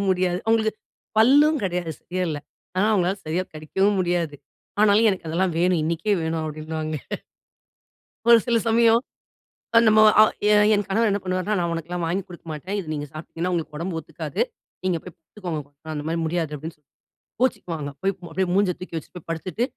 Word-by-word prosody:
முடியாது. 180 -1 +2
அவுங்களுக்கு 225 -1 +3 0.5
பல்லும் 290 +6 +6
கிடையாது. 175 -3 -1
சரியா 185 +1 -3
இல்ல. 150 -2 -2 0.4
ஆனா 195 +3 +3
அவுங்களால 190 -1 +2
சரியாக 175 +4 -1
கடிக்கவும் 190 +7 +1
முடியாது. 175 -4 0 0.5
ஆனாலும் 215 +1 +5
எனக்கு 185 -4 -4
அதெல்லாம் 175 +2 0
வேணும் 180 -1 +3
இன்னக்கே 170 +6 0
வேணும் 160 0 -1
அப்பிடின்னுவாங்க. 155 0 -4 1.3
ஒரு 235 - +10
சில 235 -2 +3
சமயம் 230 0 +5 0.8
அ - - +10
நம்ம 215 0 +6 0.2
அ - - +10 0.2
எ 210 - +6 0.2
என் 205 - +1
கணவர் 220 +3 +2
என்ன 200 0 +1
பண்ணுவார்ன்னா, 185 +2 -1
"நான் 170 -1 0
உனக்கெல்லாம் 170 +1 -4
வாங்கி 185 +4 -1
குடுக்க 175 -2 -12
மாட்டேன். 165 +6 -4
இத 175 - -6
நீங்க 145 -1 -3
சாப்பிட்டீங்கன்னா, 165 +3 -4
உங்களுக்கு 160 -3 -3
உடம்பு 170 +1 -3
ஒத்துக்காது. 160 - -5 0.4
நீங்க 185 -2 +1
போய் 180 - -10
படுத்துக்கோங்க. 165 -2 -6 0.3
அந்தமாரி 155 +3 -2
முடியாது" 160 -1 -1
அப்பிடின்னு 160 +3 -7
சொல்லி 150 -2 -43 0.5
கோச்சுக்குவாங்க. 165 - -1
போய் 195 +1 +1 0.2
அப்பிடியே 190 -1 0
மூஞ்ச 200 -2 +3
தூக்கி 180 -2 -7
வச்சிட்டு 160 - -8
போய் 175 - -13
படுத்துட்டு 180 +7 -2
180 Hz, 165 wpm, -24 LUFS, 160-200 Hz, 1.3 s, ஒரு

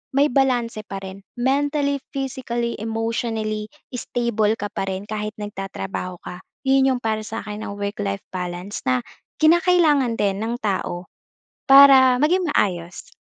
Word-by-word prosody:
may 280 0 +4
balanse 240 -5 0
pa 195 0 -6
rin. 190 +1 -8 0.2
Mentally, 280 +2 +1 0.2
physically, 250 -4 -3
emotionally 225 -1 -2 0.2
stable 235 -3 0
ka 205 -2 -5
pa 195 - -3
rin 190 0 -3
kahit 210 +1 -4
nagtatrabaho 195 -3 -5
ka. 180 - -8 0.3
'Yon 265 -1 +4
'yong 245 - -6
para 220 -1 0
sa 225 - -4
akin 210 0 -6
ang 200 - -6
work-life 200 -1 -3
balance, 180 +2 -5
na 125 -1 +3 0.4
kinakailangan 315 -6 +4
din 200 -2 +1
ng 225 +2 -2
tao 185 -3 -2 0.6
para 265 -2 +8
maging 350 +5 +2
maayos, 175 -7 -1
225 Hz, 135 wpm, -22 LUFS, 200-265 Hz, 0.6 s, para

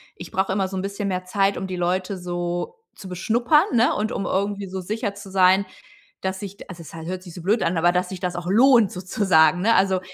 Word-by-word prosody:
ich 175 - -10
brauche 190 0 0
immer 195 -1 0
so 190 - -7
'n 185 - -3
bisschen 200 +1 -3
mehr 185 -1 -2
Zeit, 195 +1 +1
um 190 - -4
die 185 -1 -5
Leute 185 +2 -1
so 175 - -4 0.2
zu 190 - -10
beschnuppern, 235 - +2
ne? 240 +1 +3
Und 215 +2 -1
um 195 - -3
irgendwie 200 +1 -1
so 190 0 -5
sicher 210 +2 -3
zu 200 -1 -11
sein, 190 +1 +4 0.6
dass 190 0 -3
sich 200 -1 -9
also, 180 -2 -9
es 160 - -12
ha 165 - -7
hört 180 +3 -5
sich 175 -3 -11
so 175 - -9
blöd 210 +6 +1
an, 170 +2 0
aber 175 +2 +3
dass 180 0 0
sich 190 - -6
das 180 -1 -3
auch 175 0 -6
lohnt 230 0 +5
sozusagen, 180 -2 +2
ne? 225 +4 +3
Also, 190 -1 +2
190 Hz, 245 wpm, -23 LUFS, 180-200 Hz, 0.6 s, lohnt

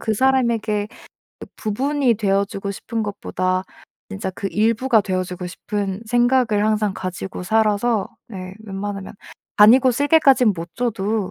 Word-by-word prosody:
그 220 -1 -1
사람에게 230 -5 +1 0.5
이 - - -7
부분이 260 +3 0
되어주고 200 -1 -1
싶은 225 +3 -4
것보다 185 -2 -2 0.5
진짜 195 -2 -4
그 195 +2 -5
일부가 225 +3 +2
되어주고 185 -1 -3
싶은 195 +1 -4
생각을 240 -3 +2
항상 210 -2 +1
가지고 185 0 -6
살아서 220 +1 +1 0.2
네 185 -3 -8
웬만하면 195 -1 -6 0.4
간이고 245 +5 +7
쓸개까지는 275 -4 +4
못 165 +1 -8
줘도 220 -4 -1
210 Hz, 305 characters per minute, -21 LUFS, 195-235 Hz, 0.5 s, 간이고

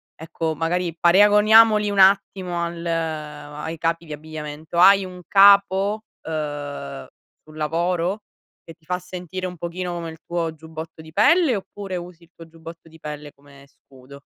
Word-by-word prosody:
ecco 160 0 -4
magari 170 +1 -2
paragoniamoli 210 +4 +5
un 200 - -1
attimo 190 -2 +3
al 170 0 -5
ai 155 -1 -4
capi 165 +1 -2
di 155 - -8
abbigliamento. 155 +1 -8
Hai 195 +2 +6
un 180 -1 -10
capo, 200 +1 +5 0.2
uhm, 145 - -5 0.4
sul 155 0 -15
lavoro, 170 +5 -1 0.4
che 165 - -12
ti 165 - -32
fa 180 +2 -2
sentire 180 0 -6
un 180 -1 -9
pochino 175 +2 -5
come 170 -1 -5
il 160 - -13
tuo 170 -2 -2
giubbotto 160 0 -10
di 160 0 -14
pelle, 275 - +4
oppure 195 -1 -7
usi 175 -1 -8
il 165 - -21
tuo 165 - -13
giubbotto 165 0 -13
di 160 0 -17
pelle 150 -1 -8
come 140 0 -19
scudo. 140 0 -17
170 Hz, 155 wpm, -22 LUFS, 155-185 Hz, 0.4 s, Hai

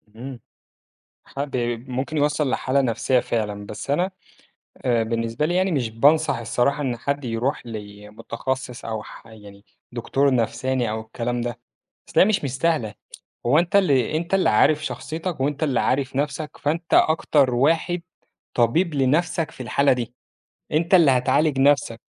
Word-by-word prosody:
إمم. 125 +2 -8 0.9
ح - - -11
ب 140 - -6 0.3
ممكن 130 +5 -3
يوصّل 150 -1 +1
لحالة 135 +2 +1
نفسيّة 125 +1 +1
فعلًا. 105 -4 -3
بس 105 - -8
أنا 180 +6 +1 0.7
آآ 120 -3 +2
بالنسبة 115 +5 -1
لي 175 - -1
يعني 185 0 +2
مش 125 -6 -1
بانصح 145 +8 +3
الصراحة 120 +5 0
إن 125 -3 -1
حد 140 +3 -3
يروح 120 +3 -2
لمُتخصّص 110 +4 -6
أو 110 -1 -4
ح - - -13
يعني 105 -3 -14 0.3
دكتور 135 +3 +1
نفساني 125 +1 0
أو 110 +1 -3
الكلام 120 +2 -3
ده. 120 0 -4 0.5
أصل - - +2
هي - - +8
مش 210 -5 +1
مستاهلة، 135 -5 0 0.5
هو 145 +7 +4
أنت 175 +3 -1
اللي 150 - +3
أنت 170 +3 -4
اللي 195 - +4
عارف 155 +8 +3
شخصيتك 165 +1 -5
وأنت 145 +3 -1
اللي 140 -5 +1
عارف 130 0 0
نَفسك، 145 +2 -3
فأنت 165 +3 -2
أكتر 145 -5 +3
واحد 165 +6 +1 0.5
طبيب 150 +9 +2
لنَفسك 155 +5 +1
في 130 - -8
الحالة 140 +4 +3
دي، 120 -1 -4 0.6
أنت 165 +4 0
اللي 165 -7 +7
هتعالج 135 +3 +2
نَفسك. 135 -5 +2
135 Hz, 150 wpm, -23 LUFS, 115-155 Hz, 0.9 s, هي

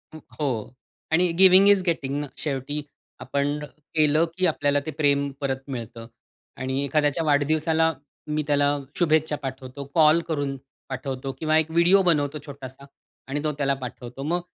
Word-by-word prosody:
हो. 130 -7 -4 0.4
आणि 175 +1 +3
giving 190 +1 +8
is 200 -2 +5
गेटिंगना. 145 -3 -1
शेवटी 145 0 -3 0.4
आपण 145 +1 -1 0.4
केलं 155 +1 +4
की 185 - +3
आपल्याला 145 -3 +1
ते 155 - -3
प्रेम 140 -2 +1
परत 135 -1 -1
मिळतं. 115 -3 -7 0.5
आणि 130 +2 -2
एखाद्याच्या 150 +2 +1
वाढदिवसाला 155 +2 +2 0.3
मी 150 0 -1
त्याला 145 0 +2 0.2
शुभेच्छा 155 -3 +2
पाठवतो, 130 +1 -6
कॉल 155 0 +6
करून 145 -3 -2 0.3
पाठवतो 135 0 -4
किंवा 155 0 +2
एक 160 0 0
व्हिडिओ 170 +4 +5
बनवतो 150 -4 +1
छोटासा. 140 -1 -10 0.4
आणि 145 +3 -3
तो 155 - 0
त्याला 140 -1 +1
पाठवतो. 125 +2 -7
मग 175 +4 0
145 Hz, 140 wpm, -24 LUFS, 135-160 Hz, 0.5 s, giving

